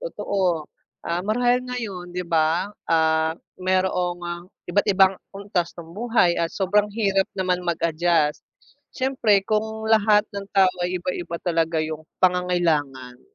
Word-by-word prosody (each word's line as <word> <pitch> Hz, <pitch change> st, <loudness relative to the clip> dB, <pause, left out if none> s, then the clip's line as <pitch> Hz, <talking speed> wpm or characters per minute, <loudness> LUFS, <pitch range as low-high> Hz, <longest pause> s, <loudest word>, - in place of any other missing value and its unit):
Totoo, 190 Hz, -, -1 dB, 0.4 s
ah, 170 Hz, +1 st, -1 dB
marahil 245 Hz, +5 st, +2 dB
ngayon 225 Hz, -8 st, -5 dB
di 180 Hz, 0 st, -4 dB
ba, 165 Hz, +4 st, +1 dB, 0.2 s
ah, 160 Hz, 0 st, +2 dB, 0.2 s
mayroong 180 Hz, -1 st, -1 dB, 0.2 s
iba't 190 Hz, +3 st, 0 dB
ibang 190 Hz, -1 st, +5 dB, 0.2 s
antas 195 Hz, -4 st, -2 dB
ng 165 Hz, -1 st, -10 dB
buhay 210 Hz, -5 st, +2 dB
at 165 Hz, -, +1 dB
sobrang 205 Hz, +3 st, +1 dB
hirap 200 Hz, -2 st, +1 dB
naman 180 Hz, -1 st, 0 dB
mag-adjust. 165 Hz, -2 st, +1 dB, 0.6 s
Siyempre 235 Hz, -7 st, +2 dB
kung 220 Hz, +1 st, -2 dB
lahat 215 Hz, -1 st, +4 dB
ng 200 Hz, 0 st, -6 dB
tao 190 Hz, -1 st, +5 dB
ay 180 Hz, +1 st, -1 dB
iba-iba 175 Hz, -1 st, -4 dB
talaga 165 Hz, -2 st, +1 dB
yung 155 Hz, 0 st, -5 dB, 0.2 s
pangangailangan, 160 Hz, -9 st, 0 dB
180 Hz, 125 wpm, -23 LUFS, 170-205 Hz, 0.6 s, ibang